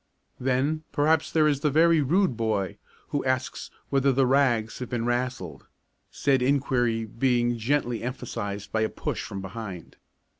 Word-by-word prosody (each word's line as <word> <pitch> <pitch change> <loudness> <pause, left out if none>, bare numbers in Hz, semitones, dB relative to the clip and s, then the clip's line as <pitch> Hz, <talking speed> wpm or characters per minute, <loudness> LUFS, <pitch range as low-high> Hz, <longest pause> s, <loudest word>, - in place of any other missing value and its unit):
Then 135 +5 0
perhaps 155 +2 +2
there 155 -1 +4
is 145 -2 +1
the 150 +1 +1
very 160 +2 +4
rude 170 +1 +2
boy 110 -4 -1 0.3
who 145 - -1
asks 130 0 -2 0.2
whether 135 0 +3
the 135 +1 +3
"rags" 125 -4 +2
have 125 - -5
been 120 -2 -2
"rassled," 120 - -3 0.4
said 135 -2 +1
enquiry 125 -4 +1
being 120 +1 +1
gently 120 0 0
emphasised 115 -5 -5
by 110 - 0
a 110 - +1
push - - -4
from 100 -1 -6
behind. 95 -3 -8
125 Hz, 150 wpm, -26 LUFS, 115-140 Hz, 0.4 s, there